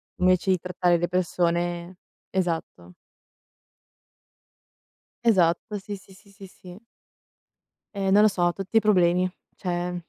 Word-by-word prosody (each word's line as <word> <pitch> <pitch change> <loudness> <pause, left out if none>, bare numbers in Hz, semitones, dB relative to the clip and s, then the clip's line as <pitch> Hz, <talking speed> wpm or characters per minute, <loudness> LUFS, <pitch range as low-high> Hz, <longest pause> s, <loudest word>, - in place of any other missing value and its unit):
Invece 185 +1 +2
di 185 - +3
trattare 180 -1 +1
le 175 +1 -1
persone 175 0 -1 0.3
esatto. 165 - -3 2.3
Esatto, 190 -1 +2
sì, 205 +1 -7
sì, 190 0 -16
sì, 200 +1 -20
sì, 195 -1 -13
sì. 185 +3 -14 1.1
Ehm, 195 -1 0
non 205 +2 +6
lo - - +7
so, 175 -3 +1
tutti 195 +3 0
problemi, 180 -3 +2 0.2
cioè 175 -1 -3
180 Hz, 115 wpm, -25 LUFS, 175-195 Hz, 2.3 s, lo